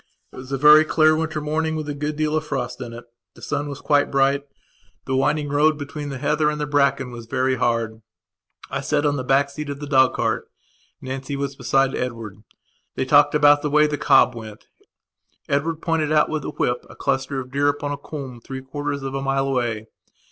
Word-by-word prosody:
It - - -12
was 130 +1 -9
a 135 - 0
very 150 +2 +8
clear 155 0 +3
winter 160 -1 -2
morning, 160 +1 -1
with 155 -1 -4
a 145 - -3
good 150 +1 -3
deal 155 0 0
of 155 - 0
frost 125 -4 -4
in 120 - -6
it. 120 +1 -9 0.3
The - - -16
sun 145 0 -2
was 140 -1 -7
quite 145 -1 +2
bright, 140 +1 +2 0.6
the 130 - -1
winding 145 +2 +1
road 150 +2 +3
between 145 0 -6
the 135 - -5
heather 150 +3 +1
and 150 0 -3
the 150 - -1
bracken 140 -2 +1
was 120 -1 -9
very 130 +1 0
hard. 115 -2 -1 0.7
I - - -2
sat 145 - 0
on 145 -1 +2
the 130 - -3
back 135 +2 +2
seat 150 +1 -6
of 140 0 -5
the 145 - -5
dog 130 -2 +3
cart; - - -1 0.5
Nancy 135 +2 -5
was 140 0 -3
beside 135 0 +1
Edward. 115 -5 -5 0.5
They - - -1
talked 145 +2 +5
about 145 -1 +5
the 150 - -1
way 150 +1 +4
the 150 -1 -1
cob 130 - +4
went; 110 -2 -10 0.8
Edward 155 +3 -1
pointed 160 -2 0
out 155 -1 +3
with 155 -1 -1
the - - -5
whip 120 0 -1
a - - -13
cluster 135 0 -1
of 130 -1 -8
deer 140 +1 +1
upon 145 0 -1
a 145 - -3
coombe 135 -4 -8
three 130 +2 -7
quarters 145 +1 -4
of 135 0 -4
a 135 - -2
mile 135 0 0
away. 120 -5 -1
140 Hz, 215 wpm, -22 LUFS, 130-150 Hz, 0.8 s, very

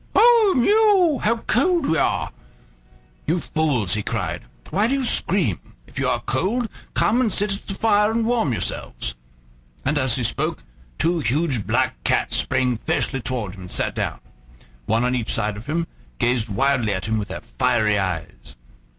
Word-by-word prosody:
"Ou, 460 -4 +6
miou! 390 - +4
how 230 +2 +1
cold 340 +4 +2
we 160 - +1
are!" - - 0 1.0
"You 165 +4 +2
fools!" 140 - 0
he 105 - 0
cried; - - -3 0.3
"why 205 +4 +2
do 270 - +1
you 270 -2 -1
scream? 170 - +1 0.3
If - - -8
you - - +1
are - - 0
cold, 230 +6 -1 0.3
come 240 +4 +3
and 230 -4 +1
sit 205 +1 +1
at 195 - -8
the 195 - -3
fire 210 0 +3
and 225 0 0
warm 230 - +1
yourselves." - - -3 0.7
And 145 +2 +1
as 130 -4 +3
he 125 - -1
spoke - - -1 0.3
two 170 +1 +1
huge 135 - 0
black - - 0
cats - - +1
sprang 125 -2 +1
fiercely 135 +3 0
forward 110 -8 -3
and 90 -1 -9
sat - - 0
down, - - -3 0.7
one 115 +3 +2
on 125 - +1
each 120 -3 -1
side 105 -2 0
of 105 +3 -10
him, 160 +3 0
and - - -10 0.3
gazed 120 - +1
wildly 120 -1 +1
at 95 - -4
him 110 0 0
with 105 - -4
their - - -6
fiery 105 -3 +1
eyes. 90 -4 -4
145 Hz, 175 wpm, -22 LUFS, -, 1.0 s, Ou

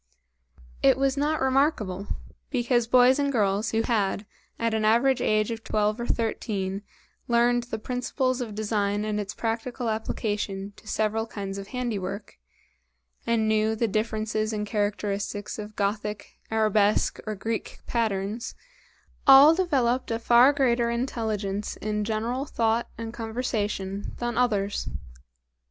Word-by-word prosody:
It - - +5
was 270 0 +1
not 300 +2 0
remarkable, 260 - +1 0.4
because 240 -3 +1
boys 250 +3 +5
and 280 -1 +1
girls 210 -2 +1
who 225 0 +1
had, 210 -3 0 0.3
at 230 -1 0
an 220 -1 0
average 235 +5 +3
age 215 +1 +2
of 225 -1 -5
twelve 215 +1 0
or 235 - -3
thirteen, 200 -4 -2 0.5
learned 240 0 +3
the 230 -2 -4
principles 250 +2 -1
of 220 -4 -5
design 210 -1 0
and 210 -1 -1
its 205 0 -4
practical 235 +1 -2
application 205 -2 -3
to - - -17
several 220 +1 0
kinds 200 -2 -5
of 195 - -8
handiwork, 205 - -4 0.9
and 230 -2 +2
knew 215 0 +2
the 230 +1 +1
differences 215 0 -1
and 210 -1 -2
characteristics 205 0 -2
of 210 0 -7
Gothic, 210 0 -3
Arabesque, 215 -1 +2
or 215 - -2
Greek 220 +3 -4
patterns, 220 0 -2 0.7
all 275 +3 +10
developed 265 -9 +1
a 225 - 0
far 240 +3 +6
greater 240 -4 +2
intelligence 220 -4 -2
in 210 -1 -2
general 230 +5 -1
thought 230 -3 0
and 225 0 -6
conversation 215 -4 -3
than 240 0 -2
others. 205 -5 0
220 Hz, 135 wpm, -26 LUFS, 210-240 Hz, 0.9 s, all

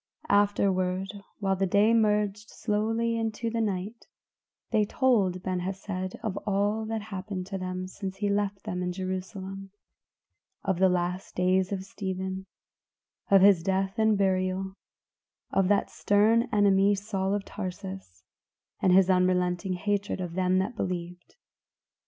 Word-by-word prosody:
'" - - -18 0.2
Afterward, 190 -1 0 0.3
while 195 -2 0
the 190 +1 0
day 205 +4 +4
merged 210 -1 +1
slowly 225 +2 -1
into 225 +1 -2
the 230 0 0
night, 205 +2 -3 0.6
they 215 -2 +3
told 205 -6 +1
Ben 185 -1 -1
Hesed 185 0 -4
of 200 -3 -2
all 205 +2 +1
that 220 -1 -3
happened 195 -2 -5
to 195 0 -5
them 185 0 -4
since 190 0 -6
he 205 - -2
had 200 0 +2
left 200 -1 -2
them 180 0 -3
in 180 0 -1
Jerusalem; 190 +1 -5 0.9
of 190 -3 0
the 190 0 +5
last 180 +1 -2
days 185 +1 +2
of 190 -2 -2
Stephen, 190 -1 -5 0.8
of 195 -1 +6
his 195 -4 +6
death 195 +3 -1
and 220 -1 +4
burial; 190 0 0 0.8
of 195 -1 +2
that 205 +1 +2
stern 225 +4 +3
enemy, 200 -1 +4
Saul 195 -1 -1
of 205 - -3
Tarsus, 190 - -7 0.6
and 185 - +4
his 185 0 +6
unrelenting 180 0 +2
hatred 200 +2 -1
of 175 -2 -4
them 185 0 +2
that 195 +6 -1
believed. 175 -3 -5
195 Hz, 145 wpm, -28 LUFS, 185-205 Hz, 0.9 s, of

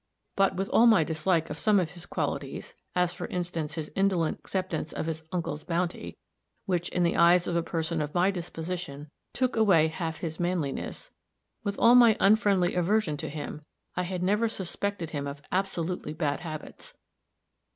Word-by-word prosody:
But, 195 -1 +3
with 195 +1 -1
all 235 - +6
my 220 -8 +6
dislike 160 +1 0
of - - -5
some 210 -2 +4
of 170 -3 -1
his 175 -1 -11
qualities 140 -3 -3 0.2
as, 180 -1 +2
for - - -5
instance, 170 -4 -3
his 155 -2 -5
indolent 190 -5 +1
acceptance 185 -5 -3
of - - -3
his 160 -1 -3
uncle's 160 -4 -3
bounty, 175 0 -2 0.5
which, 175 -2 -1
in 180 - 0
the 170 - +2
eyes 175 +1 +5
of 175 - -2
a 170 - +3
person 165 -1 -2
of 150 +2 -4
my 180 +3 +4
disposition, 165 -4 -5 0.2
took 255 -1 0
away 190 -8 +4
half 160 0 -4
his 160 -2 -4
manliness 175 -6 -3 0.5
with 200 0 -2
all 235 - +6
my 240 -3 +7
unfriendly 200 -3 +4
aversion 180 -2 +1
to - - -5
him, 150 0 -6 0.3
I 180 - 0
had 180 0 -3
never 210 +5 +2
suspected 190 -3 -3
him 145 -2 -3
of 140 0 -7
absolutely 180 -4 -2
bad 150 -3 -1
habits. 155 -2 -8
175 Hz, 170 wpm, -28 LUFS, 160-190 Hz, 0.5 s, my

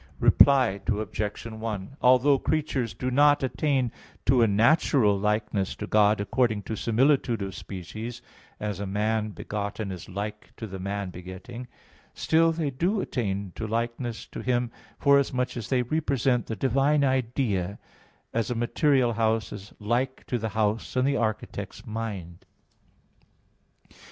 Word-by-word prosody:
Reply 125 -8 +5
Obj. 105 0 -2
1: 110 +1 -5
Although 130 +2 +5
creatures 140 -7 -1
do 130 0 -2
not 145 +2 +5
attain 130 -2 0 0.3
to 130 -1 +4
a 115 - +5
natural 110 0 +4
likeness 105 -1 -1
to 105 - -5
God 105 0 +4
according 110 0 +1
to 110 - -4
similitude 120 -1 +2
of 95 -1 -5
species, 110 +6 -7 0.4
as 105 -2 -3
a 100 - -3
man 105 +2 0
begotten 105 0 -4
is 90 -1 -8
like 105 +2 -6
to 115 - -5
the 95 -2 -7
man 100 0 -3
begetting, 95 +8 -9 0.5
still 165 +1 +3
they 160 -3 -2
do 175 +11 0
attain 100 - -2
to 110 - -5
likeness 115 +1 -3
to - - -7
Him, 120 -1 0 0.3
forasmuch 135 -3 +2
as 115 -4 -5
they 125 -2 +2
represent 135 -3 0
the 110 - -3
divine 135 +6 +2
idea, 115 -7 0 0.6
as 115 -1 0
a 125 - -1
material 125 +1 +2
house 110 0 0
is 105 0 -9
like 120 +5 -1
to 120 - -2
the 110 0 -2
house 110 +2 0
in 130 0 +2
the 140 +1 +2
architect's 110 -2 -3
mind. 100 -6 -5
115 Hz, 140 wpm, -27 LUFS, 105-130 Hz, 0.6 s, Reply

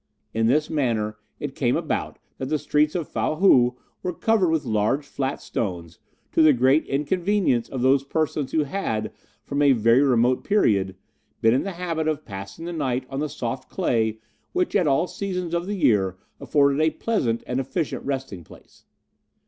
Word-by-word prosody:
In 115 0 +1
this 150 +5 +2
manner 115 -8 -1 0.2
it 145 -2 -4
came 125 -3 +1
about - - -3 0.2
that 130 - -3
the 155 - +1
streets 150 +2 +1
of 170 -4 -2
Fow - - -1
Hou 125 -9 +4 0.2
were 180 - -2
covered 215 -4 +2
with 160 -3 0
large 110 +6 0
flat 135 0 -3
stones, 85 -6 -4 0.3
to - - +3
the 155 -1 +7
great 130 +4 +3
inconvenience 170 - 0
of 130 -2 -3
those 135 +1 +4
persons 150 -1 -1
who 155 - +2
had, 135 - -3 0.3
from 140 +1 -2
a 140 -2 +6
very 115 +2 +4
remote 125 -2 +3
period, 100 - +2 0.4
been 115 0 +4
in 130 - +2
the 195 - -4
habit 170 -3 -2
of 155 -1 -2
passing 100 +9 -8
the 175 - -4
night 130 -5 -1
on 135 - -3
the 150 0 -1
soft 130 -2 -5
clay 110 -2 0 0.4
which 360 0 0
at 170 - +3
all 145 +5 +3
seasons 180 -3 -4
of 170 +1 -1
the 205 - -2
year 95 - +2 0.2
afforded 140 0 +2
a 160 - +4
pleasant 130 - -1
and 125 +1 -2
efficient 140 +4 -3
resting 130 -10 -4
place. - - -18
140 Hz, 180 wpm, -24 LUFS, 120-160 Hz, 0.4 s, the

